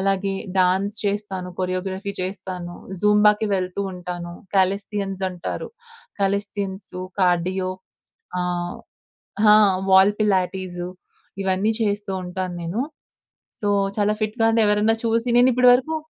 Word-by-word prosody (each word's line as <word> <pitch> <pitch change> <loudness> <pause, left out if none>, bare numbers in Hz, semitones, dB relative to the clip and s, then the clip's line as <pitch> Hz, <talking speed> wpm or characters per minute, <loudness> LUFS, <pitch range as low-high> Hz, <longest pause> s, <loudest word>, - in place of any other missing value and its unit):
అలాగే 195 0 0 0.2
డాన్స్ 190 +3 +2
చేస్తాను. 200 -3 -3
కొరియోగ్రఫీ 190 +2 -2
చేస్తాను. 185 -2 -5 0.3
జుంబాకి 210 +1 +4
వెళ్తూ 185 +1 -2
ఉంటాను. 175 -1 -6 0.2
కాలేస్థియన్స్ 195 0 0
అంటారు. 180 -1 -5 0.5
కాలేస్థియన్సు, 195 -1 -2 0.2
కార్డియో 185 +1 +1 0.7
ఆ! - - +1 1.0
హా! 210 0 +8 0.4
వాల్ 190 +2 +7
పిలాటిసు 185 -3 0 0.5
ఇవన్నీ 190 +3 +1
చేస్తూ 205 -1 -1
ఉంటాను 180 0 -4
నేను. 175 +8 -2 0.8
సో, 205 - -1 0.3
చాలా 210 0 +2
ఫిట్‌గా 215 +2 0
అంటే 225 0 +2
ఎవరన్న 210 +2 +3
చూసి 230 +1 +1
నేను 250 +1 +6
ఇప్పడు 250 0 +6
వరకు 315 +6 0
195 Hz, 110 wpm, -23 LUFS, 185-210 Hz, 1.0 s, హా